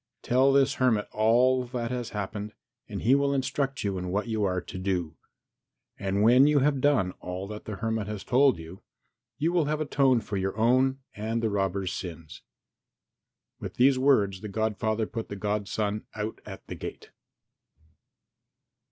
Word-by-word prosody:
Tell 130 +3 +4
this 135 0 +4
hermit 115 -5 +2
all 125 +4 +3
that 120 -1 -4
has 125 -2 -3
happened 105 +1 -5 0.4
and - - -5
he 125 - +4
will 140 0 +2
instruct 135 0 -1
you 100 -2 -1
in 90 - -4
what 105 +5 -1
you 110 -2 -1
are 90 -2 +1
to 95 +1 -8
do. 90 -4 -2 0.8
When 105 +7 +4
you 150 -1 +3
have 140 -1 +2
done 125 -11 +3
all 90 +1 -5
that 105 0 -8
the 105 - -5
hermit 110 0 -2
has 105 -2 -5
told 130 -2 +4
you, 80 +3 -10 0.6
you 160 +4 0
will 170 -4 +3
have 150 +1 -1
atoned 135 -5 +2
for 105 -4 -3
your 95 +2 -2
own 130 +4 +3
and 110 +2 -2
the 110 - +1
robber's 95 -2 -1
sins." 85 -4 -7 1.2
With - - -7
these 130 +1 +4
words 105 -9 +3
the 105 - -6
godfather 110 +1 -1
put 115 +1 -6
the 100 - -5
godson 105 +1 -2
out 110 +1 -4
at - - -9
the - - -7
gate. - - -8
110 Hz, 165 wpm, -27 LUFS, 100-130 Hz, 1.2 s, Tell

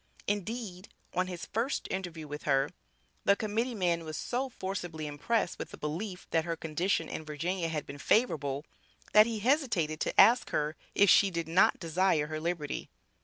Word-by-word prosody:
Indeed, 205 -2 -3 0.2
on 185 +1 +1
his 180 -2 -6
first 235 +6 -2
interview 175 -5 -4
with 150 +1 -6
her, 135 0 +2 0.5
the 200 - +5
Committee 225 +4 -1
man 175 -4 +1
was 155 -1 -5
so 260 +2 -2
forcibly 175 -8 -5
impressed 170 +8 -1
with - - -5
the - - -10
belief, 180 +5 -4
that 165 - +2
her 165 0 -2
condition 165 +2 -1
in - - -5
Virginia 165 +3 -2
had 155 -3 -3
been 140 +1 -9
favorable, 145 - +1 0.5
that 215 +1 +8
he 230 -2 -2
hesitated 225 - +1
to - - 0
ask 240 +1 +7
her 150 +1 -1 0.2
if 200 - +6
she 200 - +6
did 170 -3 -3
not 170 +4 +4
desire 165 -2 +2
her 155 +1 -4
liberty. 165 -2 -3
175 Hz, 170 wpm, -30 LUFS, 155-205 Hz, 0.5 s, that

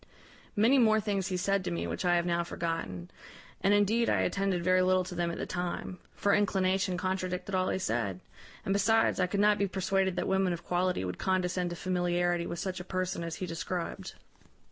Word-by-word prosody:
Many 235 +6 +4
more 220 -2 +5
things 200 -3 -1
he 185 -2 -2
said 195 +1 +1
to 180 - -2
me, 170 - -2
which - - -4
I 175 0 +4
have 170 0 +1
now 170 -1 +1
forgotten, 165 - -4 0.5
and 195 - +3
indeed 205 +3 +3
I - - +2
attended 195 -3 0
very 185 +1 +4
little 185 0 +3
to 180 - -7
them 175 -1 -1
at 170 - -4
the - - -3
time; 180 0 -4 0.2
for 200 - +2
inclination 190 -2 +1
contradicted 185 0 -3
all 185 0 +1
he - - 0
said; 115 - -2 0.5
and, 195 - +1
besides, 220 +2 +3
I 180 - +3
could 200 +2 -2
not 210 0 +4
be 200 - +2
persuaded 190 0 0
that - - -1
women 190 -1 +2
of 170 0 -6
quality 180 - 0
would 90 0 -5
condescend 185 -1 0
to 175 - -5
familiarity 175 -1 0
with 170 - -4
such 185 +1 -3
a - - -6
person 185 -1 -2
as 165 -1 -4
he 185 - -4
described. 165 +1 -4
185 Hz, 210 wpm, -30 LUFS, 175-195 Hz, 0.5 s, more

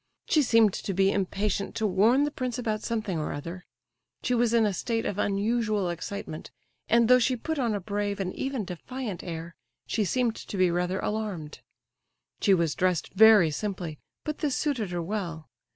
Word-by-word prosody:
She 310 - +3
seemed 225 -6 +4
to 195 - -3
be 195 +1 +4
impatient 200 +1 -1
to 220 - 0
warn 220 +8 +4
the 295 - 0
prince 255 -4 -3
about 220 -3 -2
something 215 -8 -2
or 155 - -2
other. 170 +5 -6 0.6
She 250 - +1
was 240 -1 +2
in 230 -2 +4
a 205 - +1
state 225 +5 -2
of 205 - -2
unusual 210 -1 +1
excitement, 170 -1 -6 0.4
and 235 0 +5
though 250 +1 +7
she 250 +1 +2
put 315 +6 -3
on 235 -5 +1
a - - -1
brave 205 +1 -2
and 185 -1 -2
even 265 -6 -2
defiant 205 +3 -6
air, 165 0 -6 0.3
she 220 - 0
seemed 235 +2 +1
to 200 - -7
be 185 -2 +4
rather 180 +2 0
alarmed. 200 -9 -3 0.8
She 195 -3 +4
was 165 -4 +1
dressed 180 -4 0
very 210 -5 +7
simply, 175 -3 -4 0.3
but 305 -1 -3
this 290 -5 0
suited 255 -10 -1
her 175 -1 -3
well. 170 -4 -4
205 Hz, 185 wpm, -27 LUFS, 180-230 Hz, 0.8 s, though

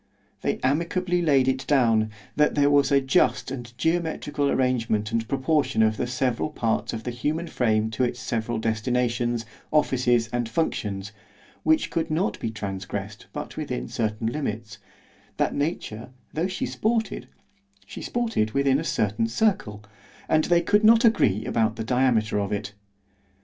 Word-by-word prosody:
They - - 0
amicably 170 +6 +1
laid 140 -6 +3
it 130 0 0
down, 115 -6 +3 0.3
that 150 0 +3
there 145 -1 +4
was 140 -1 +4
a 140 - +6
just 130 -2 +2
and 120 -3 -6
geometrical 160 -3 0
arrangement 115 -5 0
and 115 -1 -1
proportion 135 -3 +1
of 110 0 +2
the 125 - -1
several 125 +2 -1
parts 115 -7 -1
of 115 -1 -5
the 125 - -3
human 150 +7 -2
frame 110 -7 0
to 110 +4 -1
its 125 0 -1
several 120 -2 -2
destinations, 120 +1 0 0.3
offices, 125 -6 +2
and 120 -2 -1
functions, 100 -8 -2 0.5
which 315 0 +2
could 165 -2 -1
not 160 +6 0
be 115 - -2
transgressed 100 -1 -6
but - - -7
within - - -3
certain 110 - -2
limits—that 115 -4 -5
nature, 145 -7 -3 0.2
though 165 +4 0
she 190 - -3
sported——she 205 -3 -4
sported 225 - -1
within 140 0 +3
a - - -3
certain 105 -6 0
circle;—and 110 - -1
they 175 -1 +3
could 210 +5 +3
not 225 +2 +6
agree 110 - +3
about 110 -1 +1
the 115 - -4
diameter 115 -3 +2
of 100 0 -2
it. 100 -1 -3
125 Hz, 145 wpm, -25 LUFS, 110-150 Hz, 0.5 s, a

